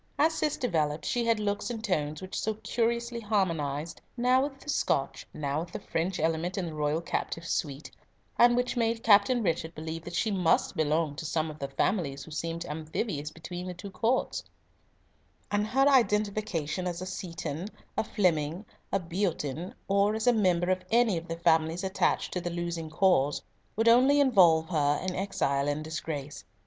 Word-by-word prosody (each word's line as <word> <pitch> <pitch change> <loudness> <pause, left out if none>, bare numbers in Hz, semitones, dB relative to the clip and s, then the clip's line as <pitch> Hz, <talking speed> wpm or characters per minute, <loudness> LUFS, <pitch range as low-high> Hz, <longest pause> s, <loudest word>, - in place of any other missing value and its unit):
As 315 +3 +4
Cis 305 -2 0
developed, 155 - 0
she 240 -1 0
had 230 -2 +2
looks 205 +1 -1
and 225 -2 -5
tones 155 -6 -1
which 185 - -4
so 220 0 -1
curiously 235 +2 -1
harmonised, 165 -8 -1 0.2
now 250 +2 +4
with 270 -1 -3
the - - -17
Scotch, 295 - 0
now 145 0 -2
with 170 +1 -6
the - - -4
French 175 +3 -2
element 165 +3 0
in 190 - -1
the 165 - -5
royal 150 +1 0
captive's 165 0 -3
suite, 145 -1 -3 0.5
and 240 0 +7
which 250 +1 0
made 230 -1 0
Captain 225 +3 +5
Richard 165 -2 -1
believe 160 +1 -5
that 175 - -6
she 220 - +1
must 180 -4 +2
belong 155 -1 +1
to 160 - -5
some 155 0 -1
of 155 - -12
the 140 - -3
families 140 0 -1
who 160 - -12
seemed 165 +2 -3
amphibious 155 0 -3
between 175 +3 -7
the 180 - -5
two 195 +3 -8
courts; 235 +6 0 1.1
and 205 +1 +1
her 270 +5 +3
identification 210 - +1
as 175 0 -3
a - - -4
Seaton, 170 -3 -5 0.3
a - - +1
Flemyng, 175 -3 0 0.3
a 195 - +2
Beatoun, 170 -3 -3
or 200 +2 +3
as 220 - -2
a 245 - +5
member 185 -4 +2
of 185 0 0
any 230 -3 +4
of 165 +1 -5
the 165 - -4
families 165 +1 +2
attached 190 0 0
to 180 - -2
the 175 - -3
losing 170 -2 -3
cause, 155 -4 +2 0.3
would 225 +2 +1
only 260 +5 +6
involve 180 - +5
her 145 -3 +2
in 185 -1 -2
exile 145 -8 0
and 145 +1 -1
disgrace. 155 -2 -5
180 Hz, 180 wpm, -29 LUFS, 160-215 Hz, 1.1 s, and